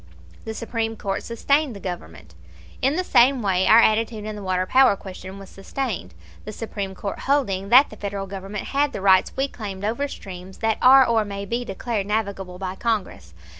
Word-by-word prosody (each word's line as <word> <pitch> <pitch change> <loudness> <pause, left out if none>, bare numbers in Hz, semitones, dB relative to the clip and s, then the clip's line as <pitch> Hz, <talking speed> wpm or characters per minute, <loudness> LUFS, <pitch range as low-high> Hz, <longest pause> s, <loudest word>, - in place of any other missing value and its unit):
The 220 - -5
Supreme 225 0 -3
Court 195 -2 -3
sustained 280 +3 0
the - - -8
Government. 85 - -8 0.5
In 270 +3 +2
the 365 - 0
same 255 -6 +4
way 190 -2 +1
our 220 - +8
attitude 220 -1 +2
in 215 0 -5
the 205 - -7
water 185 -1 0
power 255 +1 +5
question 190 0 -9
was 195 -1 -11
sustained, 195 - -5 0.3
the 215 - -7
Supreme 200 -3 -5
Court 200 +1 -5
holding 200 -9 +1
that 255 +5 +6
the - - -9
Federal 200 -1 -4
Government 195 +1 -6
had 285 +1 +1
the - - -5
rights 190 -1 +4
we 270 +1 +1
claimed 205 -6 -7
over 235 +7 -1
streams 190 -6 -10
that 225 -1 0
are 265 +1 +8
or 230 -2 +2
may 200 -1 -6
be 235 +4 -2
declared 210 -1 -3
navigable 200 -4 -3
by 185 0 -4
Congress. 190 - -3
210 Hz, 190 wpm, -23 LUFS, 190-235 Hz, 0.5 s, our